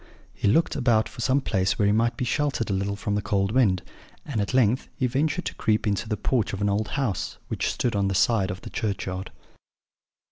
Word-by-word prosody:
He - - -1
looked 160 +12 +3
about 120 -5 +2
for - - -9
some 130 +3 +2
place 95 -5 0
where 105 - +2
he 100 - +4
might 115 +2 +1
be 125 - -1
sheltered 135 -4 0
a - - +1
little 100 +1 -1
from 105 0 -3
the 105 - 0
cold 100 0 0
wind; 105 -8 +3 0.4
and 120 -7 -2
at 100 - -2
length 125 -1 +2
he 130 - 0
ventured 145 +8 0
to - - -3
creep 110 0 0
into 105 +1 -1
the 105 - -1
porch 115 +1 0
of 100 - -4
an 100 - +2
old 105 +2 0
house, 125 -10 -2
which - - -1
stood 120 -4 -1
on 100 -1 +1
one 95 - -1
side 105 -1 +3
of 90 - -5
the - - -9
churchyard. 95 -3 -3
110 Hz, 225 wpm, -25 LUFS, 100-125 Hz, 0.4 s, he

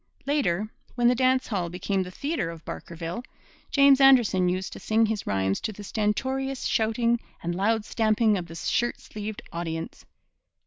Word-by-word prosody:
Later, 215 - +1 0.3
when 240 -1 +3
the - - +4
dance 255 +1 +2
hall 185 -6 -1
became 190 +2 -1
the 180 - -4
theatre 280 - -2
of 165 -1 -10
Barkerville, 170 +6 -6 0.5
James 280 -1 +6
Anderson 235 -9 +5
used 185 +1 -2
to - - -9
sing 220 +1 +2
his 215 -2 -3
rhymes 95 0 0
to - - -2
the 205 0 -10
stentorious 260 +6 -1
shouting 230 +1 +1 0.2
and 175 +1 -1
loud 210 +4 +1
stamping 215 -1 +2
of 180 -3 -3
the 165 - -10
shirt 240 +7 0
sleeved 215 +2 -7
audience. 165 -1 -5
215 Hz, 165 wpm, -26 LUFS, 180-245 Hz, 0.5 s, James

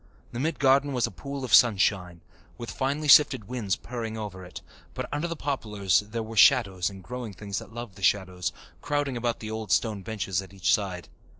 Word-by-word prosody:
The 120 - -5
mid 160 +5 -1
garden 140 +1 +3
was 125 -2 +1
a - - -5
pool 140 -1 -6
of 125 - -4
sunshine, 95 -6 +4 0.4
with 120 - -6
finely 140 +3 -2
sifted 140 -4 +6
winds 115 -6 -2
purring 115 -2 -6
over 100 -4 -6
it, 90 - -10 0.3
but - - -4
under 150 +3 -2
the 170 - -4
poplars 105 - 0
there 110 +2 -5
were 110 +1 -8
shadows 100 -6 +4
and 95 -1 -12
growing 120 +2 -6
things 100 +1 -5
that - - -12
loved 115 -4 -8
the - - -13
shadows, 90 -3 +1 0.3
crowding 145 -2 -1
about 120 -1 -2
the 110 0 -5
old 110 -3 -5
stone 105 -1 +1
benches 95 -3 -2
at 95 +1 -13
each 95 -3 +2
side. 95 -4 -2
110 Hz, 200 wpm, -27 LUFS, 95-130 Hz, 0.4 s, sifted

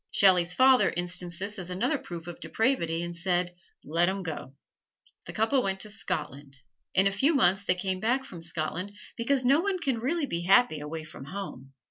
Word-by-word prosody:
Shelley's 180 -3 +4
father 260 +5 +5
instanced 175 0 -3
this 200 +3 -3
as 180 -1 -7
another 190 +11 0
proof 170 -6 -8
of 175 -1 -8
depravity 170 -9 0
and 170 0 -5
said, 175 0 0 0.3
"Let 170 +4 +2
'em 195 0 -3
go!" 155 -5 -6 0.7
The - - -5
couple 225 +5 +2
went 190 -3 -1
to 210 - -1
Scotland. 140 -8 -5 0.4
In 190 +1 +5
a 195 - +3
few 275 +11 +2
months 195 -5 +3
they 180 - +2
came 185 0 -2
back 245 +6 +1
from 175 -9 -10
Scotland, 170 +4 -4 0.2
because 255 +2 +1
no 275 +4 +5
one 395 0 0
can 270 -9 -1
really 295 +6 0
be 170 -10 -3
happy 185 -2 +4
away 155 +2 -5
from 155 -3 -11
home. 140 -6 -7
185 Hz, 190 wpm, -28 LUFS, 170-230 Hz, 0.7 s, father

